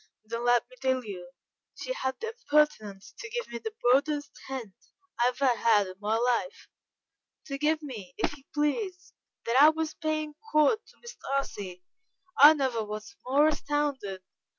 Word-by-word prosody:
"Then 230 +2 -4
let 245 -1 +4
me - - -18
tell 260 -2 0
you, 180 -4 -7 0.5
she - - -4
had 265 - -3
the 455 - -3
impertinence 290 - 0
to 440 - -7
give 480 +1 -3
me 235 0 -5
the 440 - -6
broadest 290 +4 +2 0.2
hint 255 -7 -6 0.5
I 240 - +4
ever 250 +2 0
had 220 -3 +3
in 185 - -8
my 210 +2 0
life 245 - -1 0.8
to 275 -1 -5
give 310 +1 +1
me, 210 -11 -8
if - - -1
you 275 - -19
please! 360 +5 -2 0.3
that 240 +4 +4
I 300 - +9
was 315 0 -2
paying 310 -2 -2 0.2
court 305 +9 +4
to - - -21
Miss 475 +1 -9
Darcy. 200 -10 -4 0.5
I 295 +3 +9
never 260 -6 0
was 215 - -7
more 285 +4 +4
astounded. 280 -10 -2
275 Hz, 165 wpm, -28 LUFS, 230-310 Hz, 0.8 s, I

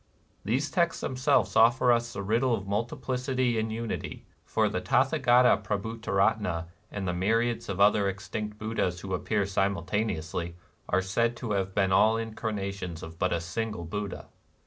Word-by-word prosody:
These 130 +8 0
texts 170 -2 +1
themselves 135 +2 +1
offer 120 +2 +5
us 120 0 +1
the 100 - -4
riddle 115 +5 +2
of 100 -3 -6
multiplicity 125 +2 -1
in 110 0 -1
unity; 115 0 -5 0.2
for - - +1
the - - -2
Tatha - - +2
gata 125 -1 +5
Prabhutaratna 105 -4 0 0.3
and 100 -2 -4
the 90 - 0
myriads 115 +6 0
of 100 -1 -3
other 100 0 +4
extinct 105 +2 -5
Buddhas 105 -5 -2
who 95 -1 -5
appear 100 +2 0
simultaneously, 95 -3 -1 0.3
are 95 +2 +2
said 115 +5 0
to 120 -3 -4
have 95 -1 -1
been 95 -2 +2
all 110 +4 +5
incarnations 100 -6 -4
of 80 -1 -9
but 90 - +1
a 85 - +1
single 85 +2 -4
Buddha. 100 +3 -5
105 Hz, 155 wpm, -28 LUFS, 95-115 Hz, 0.3 s, offer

